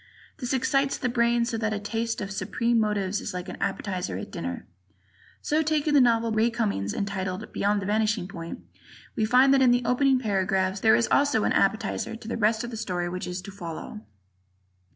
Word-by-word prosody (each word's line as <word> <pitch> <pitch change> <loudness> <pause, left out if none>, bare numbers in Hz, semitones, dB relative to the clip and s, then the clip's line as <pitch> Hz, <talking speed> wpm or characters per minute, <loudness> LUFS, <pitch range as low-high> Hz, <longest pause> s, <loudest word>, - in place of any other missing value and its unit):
This 250 -5 -4
excites 275 +1 +1
the 250 - -1
brain 235 0 +2
so 230 -1 -3
that 220 -1 -1
a - - -3
taste 225 +2 -3
of 200 - -4
the - - -5
supreme 230 +5 0
motives 205 -2 0
is - - -5
like 180 +1 -5
an - - -7
appetizer 185 - -2
at 95 - -7
dinner. 85 +1 -5 0.8
So, 305 +2 +1
taking 305 -1 +1
the 285 - +6
novel 230 -2 +3
by 220 - -1
Ray 225 +2 +4
Cummings 210 - -1
entitled 195 0 -3
"Beyond 205 0 +1
the - - -5
Vanishing 210 -2 0
Point," 170 -3 -7 0.5
we 220 - +1
find 255 +4 +5
that 270 - +4
in 255 - +6
the 245 0 +2
opening 265 +1 +3
paragraphs 195 -4 0
there 220 +2 +5
is 230 - +2
also 280 -7 +3
an - - +1
"appetizer" 225 +2 0
to 225 -1 -11
the 235 - -2
rest 220 +1 +1
of 240 - -5
the 225 - -6
story 180 -5 -2
which 180 0 -5
is 180 +1 -5
to 200 - -8
follow. 170 - -7
220 Hz, 210 wpm, -26 LUFS, 190-240 Hz, 0.8 s, the